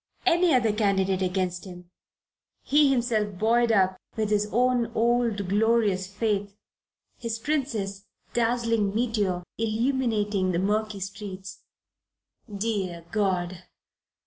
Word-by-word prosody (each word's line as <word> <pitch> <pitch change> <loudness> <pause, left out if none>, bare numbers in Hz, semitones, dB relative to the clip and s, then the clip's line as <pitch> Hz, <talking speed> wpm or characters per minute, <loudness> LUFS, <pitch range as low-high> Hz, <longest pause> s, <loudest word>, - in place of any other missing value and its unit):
Any 350 -1 +4
other 235 -6 +3
candidate 195 -3 +1
against 185 -1 -1
him, 180 -1 -11 0.7
he 295 0 +4
himself 225 -6 0
buoyed 230 +3 +3
up 190 -3 +3 0.2
with 215 -1 -1
his 210 0 +1
own 245 -1 +2
old 230 -3 +1
glorious 205 -2 +2
faith, 205 0 -2 0.6
his 230 -1 -3
Princess, 225 -8 -2 0.3
dazzling 230 -3 +1
meteor 210 -6 0 0.2
illuminating 220 -4 0
the - - +1
murky 210 +2 -1
streets 195 0 -7 0.9
dear 195 -5 -3
God! 185 -4 -1
210 Hz, 105 wpm, -26 LUFS, 195-230 Hz, 0.9 s, Any